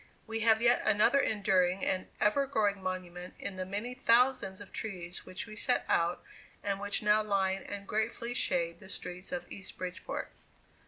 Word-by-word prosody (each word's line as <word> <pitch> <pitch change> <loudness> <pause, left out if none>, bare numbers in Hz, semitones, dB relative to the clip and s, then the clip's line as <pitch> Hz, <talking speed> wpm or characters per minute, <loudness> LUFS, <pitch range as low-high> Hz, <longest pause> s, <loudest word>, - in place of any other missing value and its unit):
We 225 0 -3
have 225 0 +4
yet 240 +1 +5
another 215 +6 +4
enduring 190 -5 +2
and 185 0 0
ever 240 +7 +3
growing 205 -6 +1
monument 180 -1 -5
in 195 - -5
the 185 0 -4
many 210 +6 -3
thousands 250 -5 +3
of 205 - -11
trees 180 -5 -4
which 185 - -5
we 215 -2 -10
set 245 +4 +1
out 170 +1 +1 0.4
and 200 -1 -1
which 205 +1 -2
now 210 +1 +5
line 195 -2 +1
and 200 -1 -6
gratefully 230 +2 -1
shade 170 -7 0
the 190 - -13
streets 180 +2 -7
of 265 -1 -3
East 195 -1 -7
Bridgeport. 180 0 -5
200 Hz, 170 wpm, -32 LUFS, 185-225 Hz, 0.4 s, yet